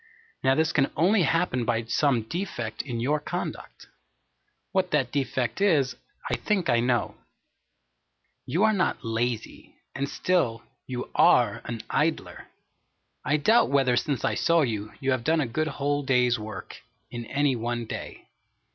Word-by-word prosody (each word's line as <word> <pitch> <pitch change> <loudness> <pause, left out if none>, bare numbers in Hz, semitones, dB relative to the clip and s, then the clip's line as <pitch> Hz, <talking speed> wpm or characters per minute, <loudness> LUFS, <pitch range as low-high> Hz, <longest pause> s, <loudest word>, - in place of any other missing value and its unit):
Now 130 0 +4
this 160 +1 +1
can 140 -2 +2
only 190 +6 +4
happen 165 -5 +1
by 115 -1 0
some 120 +1 +1
defect 120 - -4
in 125 -4 -5
your 145 +6 +1
conduct. 150 - -6 0.9
What 185 -1 +1
that 135 -7 +1
defect 130 -1 -1
is, 150 -10 +3 0.3
I - - 0
think 200 -5 0
I 120 - +3
know. 120 -1 0 1.3
You 180 +6 +1
are 220 0 +4
not 185 - 0
lazy, 115 0 -3 0.2
and 140 +1 -3
still 170 -11 0 0.2
you 125 -1 -5
are 115 -5 +4
an 115 -2 -5
idler. 155 +1 -1 0.8
I 150 - +2
doubt 220 +11 +4
whether 135 -3 +3
since 135 +2 -1
I - - +1
saw 170 0 +3
you, 110 -4 -3
you 135 0 0
have 130 -2 0
done 160 +3 +2
a 145 - +1
good 155 +7 -1
whole 145 0 -1
day's 125 -3 +2
work, 105 -3 -8 0.3
in 120 -1 -6
any 140 -1 +1
one 120 0 -3
day. - - -8
135 Hz, 155 wpm, -26 LUFS, 120-155 Hz, 1.3 s, Now